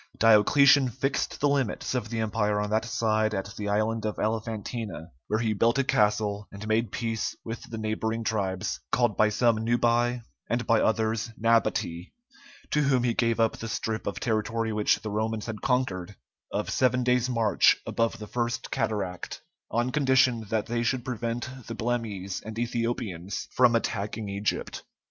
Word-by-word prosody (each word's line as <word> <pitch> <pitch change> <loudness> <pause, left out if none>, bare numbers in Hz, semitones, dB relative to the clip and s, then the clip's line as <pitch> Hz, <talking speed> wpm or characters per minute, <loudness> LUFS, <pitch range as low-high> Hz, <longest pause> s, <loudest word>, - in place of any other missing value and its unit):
Diocletian 130 +5 +6
fixed 135 +3 -2
the 145 - +4
limits 135 -6 0
of 120 -4 -2
the 115 -1 -2
Empire 105 -1 0
on 105 0 -2
that 110 +1 +1
side 110 -2 +1
at 100 +3 -4
the 105 -1 -3
island 110 +2 0
of 110 -1 -2
Elephantina, 110 -4 -3 0.2
where 110 - +1
he 110 -1 0
built 115 +4 +2
a 135 - +3
castle, 105 -2 +1
and 100 +2 -8
made 110 -1 +1
peace 115 -2 -2
with 115 0 -5
the 115 - -5
neighboring 110 +1 -2
tribes, 100 -3 -1
called 120 -3 +2
by 110 - +4
some 115 +1 +2
Nubæ 120 +1 +1 0.3
and 120 +1 0
by 115 -2 +3
others 110 +1 +1
Nabatæ, 110 -6 +1 0.6
to 150 - +3
whom 135 -3 +2
he 120 -1 +2
gave 115 -1 +1
up 115 -1 +2
the 115 - -6
strip 110 -1 -3
of 95 -3 -3
territory 110 +1 -1
which 105 0 +2
the 105 - -4
Romans 110 +1 -1
had 110 -2 -6
conquered, 105 -8 -1 0.4
of - - -2
seven 125 0 +2
days' 125 0 +2
march 115 -4 +4
above 115 0 0
the 110 - -7
first 120 +1 -3
cataract, 95 -4 -3 0.3
on 120 +2 0
condition 130 -5 +3
that 110 -1 0
they 120 0 -1
should 120 +1 0
prevent 120 0 -3 0.2
the 115 - -5
Blemmyes 110 -5 -3
and 110 0 -7
Ethiopians 115 -6 -3
from 125 -2 +4
attacking 105 -1 -2
Egypt. 100 +1 -2
115 Hz, 165 wpm, -27 LUFS, 105-120 Hz, 0.6 s, Diocletian